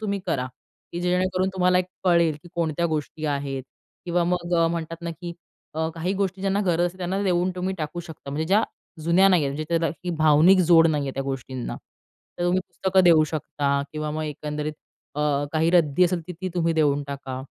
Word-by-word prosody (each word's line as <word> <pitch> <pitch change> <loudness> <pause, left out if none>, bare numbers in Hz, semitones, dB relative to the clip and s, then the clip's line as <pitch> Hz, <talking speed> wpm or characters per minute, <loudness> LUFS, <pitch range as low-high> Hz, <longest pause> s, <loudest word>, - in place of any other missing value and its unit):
तुम्ही 200 -2 -1
करा, 135 -7 0 0.5
की 175 - -3
जेणेकरून 185 +1 +1
तुम्हाला 180 0 +3 0.2
कळेल 170 -4 +3
की - - -13
कोणत्या 170 0 0
गोष्टी 155 0 -4
आहेत. 140 -2 -2 0.4
किंवा 175 -1 +1
मग 175 0 -1
अ, 165 -1 +4
म्हणतात 165 0 -4
ना 170 - -3
की 170 +2 -7 0.4
अ, 160 0 0
काही 170 +3 -2
गोष्टी 195 -1 -2
ज्यांना 195 +1 +1
गरज 175 0 +2
असते 180 +2 -7
त्यांना 185 +2 -2
देऊन 180 -1 +1
तुम्ही 185 +1 -2
टाकू 155 +3 -4
शकता, 160 -4 -10
म्हणजे 155 +3 -2
ज्या 200 +5 +4 0.4
जुन्या 175 +4 +5
नाही 180 -5 +4
आहेत. 140 - -1
म्हणजे 155 +2 -3
त्याला 165 -1 +1 0.2
ही 180 - -1
भावनिक 155 +5 +6
जोड 165 -1 +8
नाही 150 -3 +1
आहे, 135 - -3
त्या 135 - -2
गोष्टींना 130 -2 -5 0.6
तर 175 - -2
तुम्ही 180 +1 +2
पुस्तकं 190 0 +1
देऊ 160 -3 +6
शकता 140 -2 -1
किंवा 155 0 -3
मग 155 +1 -3
एकंदरीत 150 0 -4 0.8
काही 160 +1 +2
अ, 180 - +1
रद्दी 165 +1 +4
असेल 180 -1 0
तर - - -4
ती 185 - -2
तुम्ही 165 -2 +1
देऊन 145 -2 +2
टाका. 135 -2 -5
170 Hz, 200 wpm, -24 LUFS, 150-180 Hz, 0.8 s, जोड